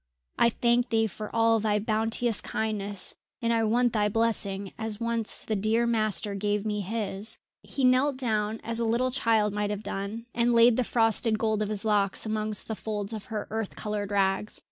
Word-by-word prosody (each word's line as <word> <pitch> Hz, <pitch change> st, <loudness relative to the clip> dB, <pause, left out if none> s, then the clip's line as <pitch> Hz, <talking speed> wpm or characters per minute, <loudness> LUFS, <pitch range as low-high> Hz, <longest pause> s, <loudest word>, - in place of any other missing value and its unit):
I 235 Hz, -, +6 dB
thank 240 Hz, +1 st, +1 dB
thee 225 Hz, -1 st, +2 dB
for 215 Hz, +1 st, -6 dB
all 225 Hz, 0 st, +3 dB
thy 210 Hz, -1 st, +1 dB
bounteous 225 Hz, +2 st, +1 dB
kindness, 205 Hz, -3 st, -1 dB, 0.2 s
and 235 Hz, -2 st, +1 dB
I 225 Hz, -1 st, +2 dB
want 240 Hz, +2 st, +2 dB
thy 210 Hz, -2 st, +2 dB
blessing 200 Hz, -3 st, -1 dB
as 220 Hz, -1 st, -5 dB
once 230 Hz, -1 st, 0 dB
the 220 Hz, -, -2 dB
dear 220 Hz, +4 st, +1 dB
master 215 Hz, -3 st, +1 dB
gave 205 Hz, +1 st, -1 dB
me 210 Hz, -1 st, -1 dB
his!" 210 Hz, +1 st, -3 dB, 0.2 s
He 275 Hz, -, -4 dB
knelt 255 Hz, +2 st, +3 dB
down 220 Hz, -3 st, -1 dB
as 230 Hz, 0 st, -2 dB
a -, -, 0 dB
little 240 Hz, +3 st, +1 dB
child 220 Hz, -5 st, +2 dB
might 205 Hz, 0 st, -1 dB
have 210 Hz, 0 st, -4 dB
done, 205 Hz, +4 st, -5 dB
and 240 Hz, 0 st, +2 dB
laid 230 Hz, 0 st, +6 dB
the 255 Hz, -, +1 dB
frosted 225 Hz, -1 st, +2 dB
gold 220 Hz, -1 st, 0 dB
of 210 Hz, -, -1 dB
his 210 Hz, 0 st, -3 dB
locks 205 Hz, -2 st, +1 dB
amongst 215 Hz, -1 st, -2 dB
the 220 Hz, -, -3 dB
folds 210 Hz, 0 st, -4 dB
of 215 Hz, -2 st, -6 dB
her 215 Hz, -3 st, -5 dB
earth 220 Hz, -2 st, -3 dB
coloured 210 Hz, -1 st, -3 dB
rags. 195 Hz, +1 st, 0 dB
220 Hz, 190 wpm, -27 LUFS, 210-230 Hz, 0.2 s, I